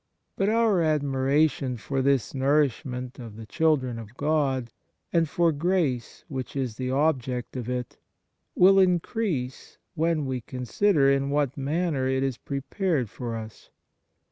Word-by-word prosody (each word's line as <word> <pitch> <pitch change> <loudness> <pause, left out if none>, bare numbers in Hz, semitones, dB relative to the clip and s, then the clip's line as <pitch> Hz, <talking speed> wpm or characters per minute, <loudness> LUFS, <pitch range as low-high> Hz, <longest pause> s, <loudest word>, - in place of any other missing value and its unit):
But 195 +1 +1
our 220 -5 +3
admiration 140 -3 +1
for 135 +4 -2
this 135 -2 +1
nourishment 130 -2 0
of 115 -4 -9
the 110 0 -9
children 130 -2 +1
of 110 +2 -11
God, 140 -5 0 0.4
and 165 -3 +2
for 170 +2 +2
grace 150 - -1
which 130 -5 -5
is 130 -5 -2
the 130 -1 -2
object 130 -4 0
of 125 -2 -4
it, 125 -1 -4 0.6
will 195 +2 +6
increase 180 - 0 0.2
when 160 -2 0
we 130 -2 -2
consider 135 - +2
in 140 0 +1
what 145 -2 0
manner 145 -1 -1
it 130 0 +1
is 135 -3 -2
prepared 140 - -2
for 120 -2 -5
us. 110 -1 -9
135 Hz, 140 wpm, -26 LUFS, 125-160 Hz, 0.6 s, will